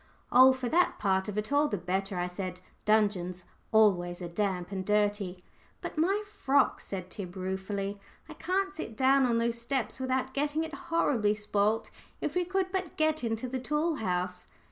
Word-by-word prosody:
"Oh, 260 +1 +8
for 260 -1 -2
that 345 +8 +2
part 190 -1 +1
of 210 0 -4
it, 210 +5 -2
all 290 +1 +4
the 205 - -2
better," 190 +2 -2
I 175 - 0
said. 180 0 -5 0.3
"Dungeons 200 -5 +2 0.3
always 180 -5 +3
are 175 - -5
damp 180 0 -2
and 190 -1 -3
dirty." 205 -3 0 0.4
"But - - -6
my 385 +7 +2
frock?" 280 -10 +2
said 185 -2 -6
Tib, 185 -3 -7
ruefully. 195 +2 -3 0.3
"I 310 - -9
can't 380 +5 -1
sit 225 - -6
down 265 0 +4
on 235 -1 +2
those 235 0 0
steps 260 +1 -2
without 260 0 -1
getting 295 +2 0
it 320 -1 -6
horribly 265 -8 +1
spoilt. 210 +1 0 0.3
If - - -2
we 360 0 +1
could 375 +1 -1
but 370 -3 -3
get 310 -2 +1
into 225 +1 -1
the 260 +1 -3
tool 300 +5 0
house!" 180 -3 -2
220 Hz, 180 wpm, -30 LUFS, 190-285 Hz, 0.4 s, Oh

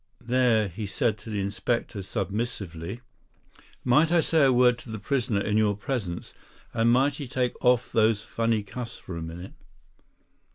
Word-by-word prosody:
There 120 -3 +3
he 100 +3 -5
said 105 +2 0
to 105 - -11
the 105 -2 -2
Inspector 100 +2 -2
submissively: 100 -2 -4 0.8
"Might 150 +7 +4
I 175 - +5
say 160 -1 +3
a 135 - +5
word 125 -1 +4
to - - -12
the 110 - -4
prisoner 115 -1 0
in 105 +1 0
your 105 -2 +3
presence; 100 -6 -4 0.4
and 115 0 +3
might 135 +3 +3
he 145 - -5
take 125 0 0
off 125 -1 +3
those 110 -1 +3
funny 115 -2 0
cuffs 120 +3 -7
for 90 - -8
a 85 - -5
minute?" 85 +3 -7
115 Hz, 165 wpm, -26 LUFS, 100-125 Hz, 0.8 s, I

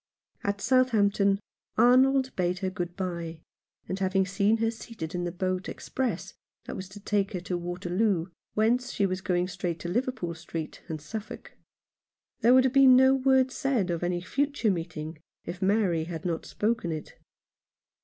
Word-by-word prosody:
57 - - -41
Rough 200 0 0
Justice. 200 - -5
At - - -2 0.2
Southampton 200 -3 +3 0.4
Arnold 260 +3 +5
bade 180 0 0
her 185 - -1
good 175 -2 -4
bye, 170 -4 -4 0.5
after 190 +1 -2
having 190 0 +2
seen 200 +3 +2
her 225 0 +1
seated 220 -7 -7
in 175 0 -2
the 175 - -2
boat 185 +1 -2
ex - - -9
press 260 -2 -2 0.3
that - - -6
was 190 0 -6
to 200 +2 -11
take 200 0 0
her 180 - -2
to 180 0 -3
Waterloo, 175 +1 0 0.3
whence 240 +3 +2
she 200 - +1
was 185 -1 -2
going 180 -1 0
straight 175 -2 -3
to - - -4
Liverpool 240 -4 -1
Street, 160 -1 -6
and 160 -3 -4
Suffolk. 210 +8 -7 0.9
There 240 +3 +6
would 260 - +7
have 260 -1 +1
been 270 -2 +8
no 265 +1 +6
word 265 -1 +3
said 250 -10 0
of 170 - -2
any 175 0 -1
future 280 +2 0
meeting 160 -3 -5 0.3
if 180 - -6
Mary 190 -5 +2
had 165 -1 -6
not 165 -2 -2
spoken 215 -5 -1
it. 155 -1 -7
190 Hz, 180 wpm, -28 LUFS, 175-230 Hz, 0.9 s, been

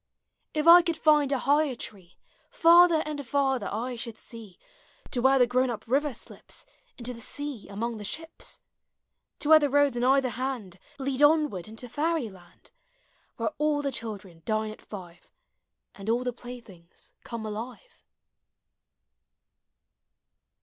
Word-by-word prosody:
If 305 +1 0
I 345 +1 +11
could 335 -1 -1
tiud 300 -3 +3
a 275 - +2
higher 285 +1 +2
tree 190 -6 -10 0.3
Farther 340 -1 +6
and 300 -2 -4
farther 270 0 0
I 245 +4 -3
should 230 -1 -7
see, 220 -6 -10 0.5
To 245 - 0
where 265 +2 +5
the 250 - +6
grown 255 +2 +1
up 230 -2 -5
river 285 +4 +1
slips - - -10 0.3
Into 250 0 -3
the 230 - -10
sea 285 -3 -5
among 225 +3 -3
the - - -7
ships, 320 +11 -6 0.8
To 295 - -1
where 315 0 +9
the 290 -2 +1
roads 285 -2 +3
on 240 - -1
either 265 0 +4
hand 240 -8 -4 0.2
Lead 270 0 -2
onward 295 - +3
into 225 +3 -8
fairy 300 0 -1
land. 175 -2 -18 0.7
Where - - 0
all 300 -1 +1
the 280 - -1
children 200 -8 -6
dine 215 -1 -1
at 215 - -15
live, 175 -4 -10 0.6
And 200 +2 -7
all 240 +2 +2
the 250 -1 -2
playthings 230 -8 -12
come 230 -2 -6
alive. 240 - -7
250 Hz, 150 wpm, -27 LUFS, 220-290 Hz, 0.8 s, I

